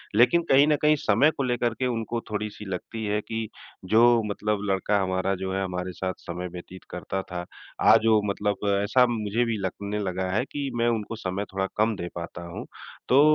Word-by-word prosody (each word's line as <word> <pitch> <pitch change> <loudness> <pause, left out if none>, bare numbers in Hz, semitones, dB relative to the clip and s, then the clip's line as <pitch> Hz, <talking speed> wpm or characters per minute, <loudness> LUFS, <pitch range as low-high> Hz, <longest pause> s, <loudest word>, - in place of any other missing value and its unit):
लेकिन 125 +10 +5
कहीं 140 +2 +7
न 150 - +4
कहीं 150 0 +5
समय 125 +10 +5
को 135 - 0
लेकर 120 -2 0
के 130 - +1
उनको 115 0 -2
थोड़ी-सी 105 0 -4
लगती 105 +4 -5
है 105 0 0
कि 110 0 -4 0.4
जो 115 +4 +5
मतलब 105 0 -1
लड़का 100 +2 +1
हमारा 95 +1 0
जो 95 0 -4
है 95 - 0
हमारे 90 0 -3
साथ 95 +2 -3
समय 90 +1 -6
व्यतीत 90 +1 -10
करता 95 - -4
था, 90 -2 -6 0.4
आज 115 - +6
वो 110 -2 +5
मतलब 100 0 -1 0.3
ऐसा 125 +4 +4
मुझे 110 0 0
भी 115 -2 -1
लगने 100 +2 -3
लगा 95 -1 -2
है 105 +5 +1
कि 140 -1 -3
मैं 120 0 +2
उनको 115 -1 -2
समय 100 -1 -3
थोड़ा 95 0 0
कम 110 +1 +2
दे 85 -3 -5
पाता 85 0 -6
हूँ। 85 - -7 0.4
तो 130 - +6
105 Hz, 200 wpm, -26 LUFS, 95-115 Hz, 0.4 s, कहीं